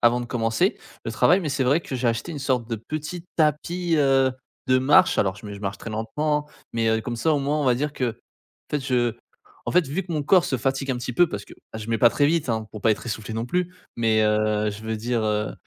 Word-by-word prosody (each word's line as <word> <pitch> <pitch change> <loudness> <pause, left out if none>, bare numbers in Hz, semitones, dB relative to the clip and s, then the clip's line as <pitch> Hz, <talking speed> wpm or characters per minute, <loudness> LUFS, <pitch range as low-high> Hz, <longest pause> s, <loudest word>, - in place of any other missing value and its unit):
avant 120 +1 +4
de 120 - -5
commencer 115 -2 0 0.3
le - - -3
travail 180 +3 +4
mais 155 - -3
c'est 135 -1 0
vrai 145 +6 +3
que 130 - -5
j'ai 125 0 -1
acheté 115 +9 -1
une 150 - -5
sorte 130 -4 -1
de 115 - -1
petit 155 - -6
tapis, 165 +3 +1
heu, 135 -2 +4 0.4
de 130 0 +5
marche 135 +3 +5
alors 95 -2 +2
je 100 - -14
me 105 - -6
je 100 - -9
marche 100 -1 -4
très 115 - -7
lentement. 150 +7 -1 0.3
Mais 115 -1 0
heu, 110 0 +2
comme 120 +2 -4
ça 155 +8 +1
au 145 - +1
moins 145 +2 0
on 145 - 0
va 125 -2 +4
dire 145 +3 -2
que, 120 -5 -2 0.5
peut-être 145 -2 -2
je 120 -3 +1 0.5
en - - -1
fait, 180 -1 +4
vu 175 +7 -2
que 170 - -5
mon 150 - -1
corps 175 +4 +4
se 130 - 0
fatigue 135 +1 -1
un - - -3
petit 125 +1 -4
peu 175 +7 +4
parce 100 - -5
que - - -15 0.2
bah, 110 - -5
je 110 - -7
mets 115 - +1
pas 120 - +7
très 145 - +1
vite 160 -3 +1
hein, 110 -1 -1
pour 105 - -7
pas 110 - +3
être - - -6
essoufflé 110 -1 -4
non 115 +2 -2
plus. 180 +5 -1 0.2
Mais, 110 -2 +3
heu, 105 0 +2
je 100 +1 -8
veux 110 0 -2
dire, 115 +1 -1
heu, 105 0 0
125 Hz, 270 wpm, -24 LUFS, 110-150 Hz, 0.5 s, pas